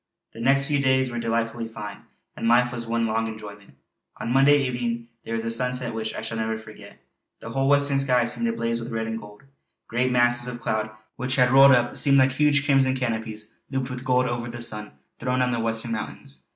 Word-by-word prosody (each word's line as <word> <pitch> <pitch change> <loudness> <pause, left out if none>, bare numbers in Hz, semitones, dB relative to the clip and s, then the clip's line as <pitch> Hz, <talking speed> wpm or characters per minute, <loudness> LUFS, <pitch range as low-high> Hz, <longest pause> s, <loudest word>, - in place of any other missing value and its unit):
_" - - -59
The - - -11
next 135 +3 +3
few 145 -1 0
days 130 -2 +2
were 120 - -3
delightfully 115 0 -2
fine, 105 -2 -8 0.4
and - - -3
life 120 +1 +4
was 120 -1 -5
one 115 0 0
long 115 0 0
enjoyment. 105 -6 -10 0.4
On 120 - -3
Monday 140 +2 +6
evening 120 -2 -3
there 115 - -4
was 115 0 -3
a 115 - -1
sunset 125 0 -1
which 110 0 -4
I - - -5
shall 110 0 -4
never 110 0 -1
forget. 110 -2 -13 0.4
The 115 - -8
whole 135 +2 0
western 140 -1 +3
sky 125 -3 +3
seemed 235 - -1
ablaze 115 - -1
with 115 +1 -7
red 115 0 -2
and 115 0 -4
gold; 105 +2 -14 0.4
great 125 +2 0
masses 120 0 +3
of 120 -1 -5
cloud 110 -2 -2 0.3
which 130 +1 -2
had 125 -1 +4
rolled 135 +1 +8
up 120 -1 +2
seemed 140 -1 +5
like 130 0 +5
huge 145 +1 +2
crimson 135 -2 +3
canopies 110 -3 -4
looped 135 -1 -3
with 125 0 -6
gold 125 -1 +2
over 120 -1 -3
the 120 0 -6
sun 105 -5 -3 0.3
throned 125 +1 0
on 125 - 0
the 120 - -1
western 115 +1 -1
mountains. 70 -10 -6
120 Hz, 215 wpm, -24 LUFS, 115-130 Hz, 0.4 s, rolled